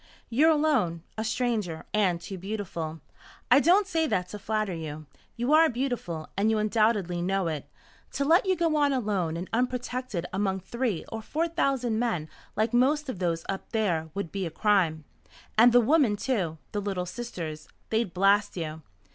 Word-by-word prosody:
You're 295 +8 +5
alone, 270 - +2
a 220 - -2
stranger, 220 -7 -1
and 190 -5 +2
too 190 +2 -7
beautiful. 170 -5 -5 0.5
I - - +8
don't 370 +7 +4
say 325 -4 0
that 180 -8 -1
to 210 - -7
flatter 215 -2 -1
you. 155 -2 -6 0.3
You 245 +5 0
are 320 +1 +7
beautiful, 240 - -3
and 205 +3 +2
you 220 - +2
undoubtedly 215 -5 +1
know 190 +1 0
it. 155 -3 -4 0.4
To 280 - 0
let 340 +7 +4
you 375 - +3
go 330 -3 +1
on 290 -1 +3
alone 200 -10 -1
and 180 +2 -5
unprotected 250 -5 -2
among 190 -1 0
three 235 -1 -2
or 225 - -5
four 315 +9 -1
thousand 260 -8 0
men 200 -11 -1 0.3
like 220 +3 0
most 280 +4 +2
of 205 - -4
those 170 -2 -1
up 195 - -4
there 175 -8 0
would 200 -5 -3
be 195 -3 -2
a - - -4
crime. 165 -4 +1 0.5
And 235 +3 +7
the 245 - +7
women, 265 -3 +3
too 195 -9 -1
the 205 - -2
Little 195 -3 -2
Sisters. 175 -7 -6 0.2
They'd 220 -4 +1
blast 195 +2 +3
you. 160 -1 -4
210 Hz, 175 wpm, -27 LUFS, 175-250 Hz, 0.5 s, I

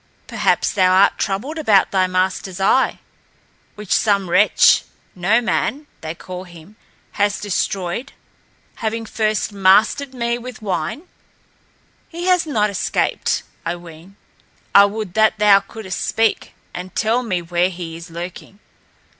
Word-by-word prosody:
Perhaps - - +1
thou 185 -2 +3
art 195 +2 +4
troubled 240 +11 -2
about 210 -10 +3
thy 185 -1 +2
master's 185 0 -2
eye, 230 +7 +2 0.8
which 210 -3 -3
some 200 -4 +1
wretch 205 +4 +5 0.3
No 200 +6 +2
Man, 270 +5 -1 0.2
they 160 +1 -5
call 185 +2 -8
him 175 +3 -15 0.5
has 205 0 +1
destroyed, 195 +4 -2 0.7
having 225 0 -3
first 215 -1 -1
mastered 210 +8 +3
me 235 0 -1
with 245 -1 -9
wine. 195 - -3 1.1
He 345 +1 -6
has 365 -3 +2
not 210 -8 +1
escaped, 195 - -1 0.2
I 170 - -2
ween. 170 +2 -14 0.6
I 200 - +8
would 205 -2 -4
that 220 +1 +3
thou 205 -1 +6
couldst 195 -1 -6
speak 225 -1 0 0.2
and 180 +1 -8
tell 230 +3 +1
me 185 -8 -2
where 175 +1 +1
he 170 -3 -7
is 170 +1 -10
lurking. 175 +3 -8
200 Hz, 135 wpm, -19 LUFS, 180-225 Hz, 1.1 s, I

